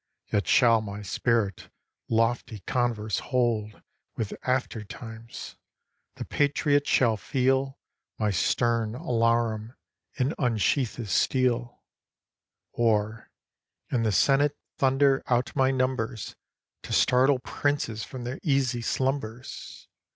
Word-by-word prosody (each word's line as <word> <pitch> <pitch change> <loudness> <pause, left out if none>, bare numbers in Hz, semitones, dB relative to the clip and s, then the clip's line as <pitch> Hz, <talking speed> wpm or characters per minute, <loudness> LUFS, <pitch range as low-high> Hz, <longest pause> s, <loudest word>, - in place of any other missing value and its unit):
Yet 105 - +1
shall 115 -3 +5
my 100 -1 -6
spirit 105 -1 0 0.4
lofty 115 -2 0
converse 110 -2 -1
hold 115 -5 -1 0.3
With 110 - -3
after 125 -4 -1
times. 115 +2 -9
â - - -52
The - - -6
patriot 145 0 +1
shall 115 -4 +3
feel 135 +5 0 0.4
My 105 -2 +1
stern 115 +4 +1
alarum, 115 -2 0 0.4
and 130 +5 +1
unsheath 120 +1 +1
his 115 -6 -6
steel; 120 0 +1 0.9
Or, 110 -1 0 0.6
in 125 - +1
the 110 -2 +1
senate 140 +8 +3 0.2
thunder 135 0 +3
out 120 0 0
m) 135 -1 +2
numbers 130 -4 -2 0.5
To - - -6
startle 130 +2 +4
princes 125 -4 -2
from 130 -2 -7
their 125 +3 -5
easy 135 -5 +1
slumbers. 130 -1 -3
120 Hz, 110 wpm, -27 LUFS, 110-130 Hz, 0.9 s, shall